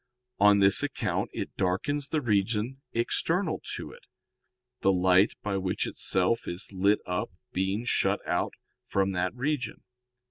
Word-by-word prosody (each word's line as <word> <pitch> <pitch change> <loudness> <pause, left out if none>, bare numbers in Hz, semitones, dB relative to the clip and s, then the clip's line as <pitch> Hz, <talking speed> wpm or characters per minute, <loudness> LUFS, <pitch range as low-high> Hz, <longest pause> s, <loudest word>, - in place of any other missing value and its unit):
On 105 0 +6
this 100 -1 +4
account - - -1
it - - -5
darkens 135 +10 0
the 155 - 0
region 110 +3 0
external 160 +8 0
to - - -7
it, - - -16 0.7
the 95 - +3
light 95 +1 +4
by 100 -2 -1
which 95 -1 -1
itself 95 +5 0
is 95 +4 -4
lit 100 +2 +3
up 90 0 -2 0.2
being 95 +5 -1
shut - - +2
out - - 0 0.3
from 95 0 0
that 90 +2 -1
region." 135 +1 -2
100 Hz, 140 wpm, -28 LUFS, 95-120 Hz, 0.7 s, On